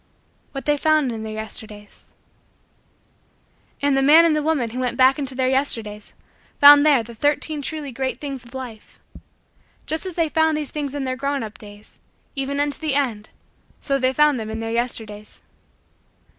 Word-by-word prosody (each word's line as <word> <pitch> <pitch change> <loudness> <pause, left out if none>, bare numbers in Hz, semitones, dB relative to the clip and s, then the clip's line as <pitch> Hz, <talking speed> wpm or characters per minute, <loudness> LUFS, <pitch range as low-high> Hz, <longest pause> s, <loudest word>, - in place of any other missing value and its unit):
What 275 - -7
They 295 0 +2
Found 310 -3 +2
in 225 -1 -6
Their 220 0 -6
Yesterdays 215 -1 -9 1.7
And 285 -1 +3
the 270 - +2
man 310 +5 +7
and 320 -2 +3
the 305 - 0
woman 290 -7 0
who 250 - -5
went 250 -1 -2
back 260 +3 +4
into 275 -2 -4
Their 255 0 0
Yesterdays 225 -6 -1 0.5
found 290 0 +9
there 285 -6 +4
the 235 +1 -11
Thirteen 290 +4 -1
Truly 295 -1 -5
Great 260 0 -3
Things 275 -3 -6
of 240 +2 -15
Life. 245 -5 -9 0.9
Just 315 +4 -3
as 365 - -7
they 330 -2 +1
found 320 0 +1
these 300 -2 -5
things 290 -2 -4
in 285 - -3
their 260 -1 -2
grown 275 0 -2
up 215 -1 -9
days, 205 0 -14 0.4
even 275 +1 -3
unto 290 -1 0
the 310 -4 -1
end, 235 -7 -1 0.5
so 275 -1 -1
they 255 0 +2
found 300 -1 +3
them 220 -1 -5
in 220 0 -5
Their 225 0 -4
Yesterdays. 220 -3 -5
270 Hz, 180 wpm, -21 LUFS, 230-290 Hz, 1.7 s, found